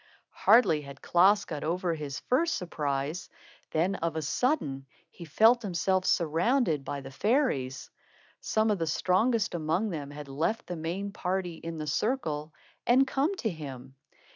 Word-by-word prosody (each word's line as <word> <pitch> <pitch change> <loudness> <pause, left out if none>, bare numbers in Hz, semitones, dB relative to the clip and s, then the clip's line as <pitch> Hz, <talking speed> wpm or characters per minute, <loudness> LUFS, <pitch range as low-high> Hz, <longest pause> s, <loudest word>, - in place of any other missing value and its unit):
Hardly 220 -10 +4
had 140 -1 -11
Klaas 195 +4 +4
got 150 -3 -5
over 175 +2 0
his 150 -4 -5
first 325 +7 +1
surprise, 150 -1 -3 0.4
than 170 +5 +1
of 165 -4 -2
a 160 - -2
sudden 145 - -1 0.2
he 170 - -10
felt 225 +10 +4
himself 185 -1 0
surrounded 170 - +2
by 140 +1 -4
the 135 0 -9
fairies. 145 - 0 0.5
Some 220 0 +1
of 205 - 0
the 165 - -1
strongest 195 +8 +1
among 170 +6 0
them 145 -4 -5
had 145 0 -8
left 160 +12 -1
the 180 - -5
main 175 +5 -4
party 185 -2 -2
in 165 0 -6
the 155 - -4
circle 155 - -1 0.4
and 255 +3 +5
come 275 +8 0
to 230 - -2
him. 135 -5 -8
170 Hz, 155 wpm, -29 LUFS, 150-215 Hz, 0.5 s, and